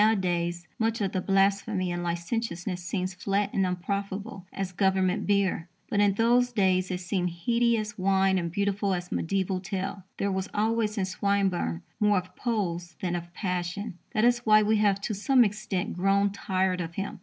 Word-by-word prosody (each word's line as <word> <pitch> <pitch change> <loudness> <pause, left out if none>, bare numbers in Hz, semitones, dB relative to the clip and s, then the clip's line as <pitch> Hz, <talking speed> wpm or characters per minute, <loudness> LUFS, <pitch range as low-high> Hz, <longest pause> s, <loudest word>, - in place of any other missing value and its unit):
Nowadays, 175 -5 +1
much 225 0 +1
of 200 -3 0
the 185 - -1
blasphemy 195 -1 +1
and 175 0 -2
licentiousness 175 +1 -3
seems 185 +1 -2
flat 200 +2 -1
and 195 -1 +2
unprofitable 200 +2 -4
as 195 -1 -3
Government 190 -1 +1
beer. 195 -4 +1 0.2
But 205 - +2
in 205 -1 +4
those 245 +3 +3
days 185 -4 +2
it 180 -1 -3
seemed 180 0 -1
heady 235 +7 +1
as 210 -1 -4
wine 190 0 +3
and 170 -1 -3
beautiful 200 0 0
as 180 0 -6
a - - -1
mediaeval 190 +1 0
tale. 195 +1 -4 0.2
There 200 - 0
was 190 0 -2
always 220 0 +1
in 195 - +1
Swinburne 190 - 0 0.2
more 210 -2 +4
of 185 0 -4
pose 175 -8 -2
than 175 -2 -1
of 175 0 -5
passion. 180 +1 -3 0.2
That 215 - +4
is 240 0 +4
why 215 -2 +5
we 215 +1 +3
have 205 -2 +3
to 215 - -2
some 245 +5 +4
extent 210 -3 -2
grown 195 +2 +2
tired 190 -2 0
of 165 0 -6
him. 195 -1 -4
195 Hz, 180 wpm, -27 LUFS, 180-210 Hz, 0.2 s, why